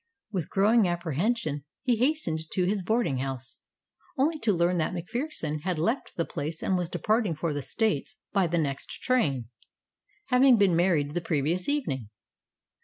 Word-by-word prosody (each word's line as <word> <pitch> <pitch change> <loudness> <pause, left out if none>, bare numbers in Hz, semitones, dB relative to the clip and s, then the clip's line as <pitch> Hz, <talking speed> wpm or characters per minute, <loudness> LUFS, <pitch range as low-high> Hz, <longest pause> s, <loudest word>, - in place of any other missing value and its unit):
With 180 -7 -3
growing 210 +1 +4
apprehension 175 - -1 0.2
he 245 -3 +2
hastened 215 - 0
to 185 - +1
his 200 +2 0
boarding 220 - +1
house, 135 0 -5 0.6
only 305 +4 +2
to 225 -5 +2
learn 175 -1 +2
that 160 +3 -1
MacPherson 180 - -3
had 180 0 -1
left 225 - -1
the 165 - 0
place 155 +3 -5
and 190 - +1
was 175 -2 -1
departing 215 -3 +1
for 155 0 -2
the 145 - -2
States 140 - -1 0.2
by 195 -3 +3
the 170 +1 0
next 140 -4 -1 0.2
train, 140 - +1 0.8
having 255 -1 +6
been 195 -4 +4
married 165 -5 +2
the 175 - -1
previous 165 - 0
evening. 140 - -1
175 Hz, 160 wpm, -28 LUFS, 155-225 Hz, 0.8 s, having